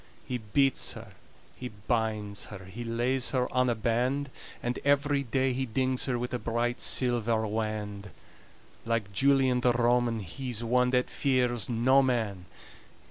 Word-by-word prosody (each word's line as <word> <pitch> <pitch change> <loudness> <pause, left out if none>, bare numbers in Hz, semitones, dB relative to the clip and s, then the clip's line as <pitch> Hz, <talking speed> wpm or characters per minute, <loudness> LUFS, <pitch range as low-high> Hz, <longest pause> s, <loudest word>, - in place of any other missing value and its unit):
He 125 -1 -2
beats 135 +5 +1
her, - - -10 0.5
he 125 - -6
binds 105 -1 -2
her, 95 -3 -10
He 100 +6 -7
lays 120 +3 0
her 125 -2 0
on 125 0 +3
a 120 - +1
band; 125 +5 0 0.3
And 120 +1 -2
every 145 0 +2
day 130 0 0
he 130 +1 -2
dings 130 +2 0
her 125 -3 0
With 125 +1 -4
a 125 - -1
bright 120 +2 -1
silver 115 -3 +1
wand 105 -2 -3 0.7
Like 115 -3 -2
Julian 135 +2 +3
the 125 0 +3
Roman 120 -1 +2
He's 120 +5 -4
one 125 +2 +2
that 125 0 +1
fears 125 -3 0
no 125 +4 +4
man. 110 -8 -1
120 Hz, 150 wpm, -29 LUFS, 110-130 Hz, 0.7 s, no